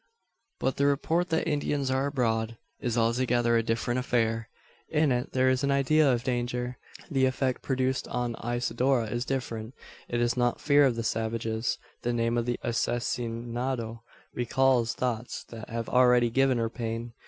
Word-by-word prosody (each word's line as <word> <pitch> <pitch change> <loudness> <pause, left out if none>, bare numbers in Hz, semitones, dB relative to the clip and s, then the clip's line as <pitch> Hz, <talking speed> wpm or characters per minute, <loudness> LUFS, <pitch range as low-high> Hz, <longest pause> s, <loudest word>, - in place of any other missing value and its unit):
But 130 - 0
the 140 - +3
report 165 +5 +1
that 160 - 0
Indians 145 -2 0
are 135 +1 +1
abroad, 115 -5 0 0.2
is 120 -1 -2
altogether 120 0 +2
a 115 - +4
different 115 +2 -1
affair. 115 -3 0 0.4
In 150 -2 +2
it 125 0 -1
there 130 0 +3
is 130 +1 +2
an 140 - +2
idea 140 +1 +4
of 120 -1 0
danger. 125 0 -2 0.3
The 135 -2 +3
effect 130 0 -1
produced 130 -1 -1
on 120 -1 -2
Isidora 120 0 0
is 120 +1 -2
different. 120 -3 -4 0.3
It 120 - -1
is 120 0 +1
not 120 -1 +1
fear 145 -1 +5
of 125 - 0
the 115 - -3
savages. 110 +1 -1 0.2
The 120 0 -1
name 115 0 +1
of 120 0 0
the 120 - -1
"asesinado" 120 0 -2 0.3
recalls 120 -1 +2
thoughts 120 -2 -3
that 115 -2 -9
have 115 0 -3
already 125 -2 +4
given 135 0 +3
her 115 -1 -1
pain. 115 -1 -4
120 Hz, 165 wpm, -28 LUFS, 115-130 Hz, 0.4 s, fear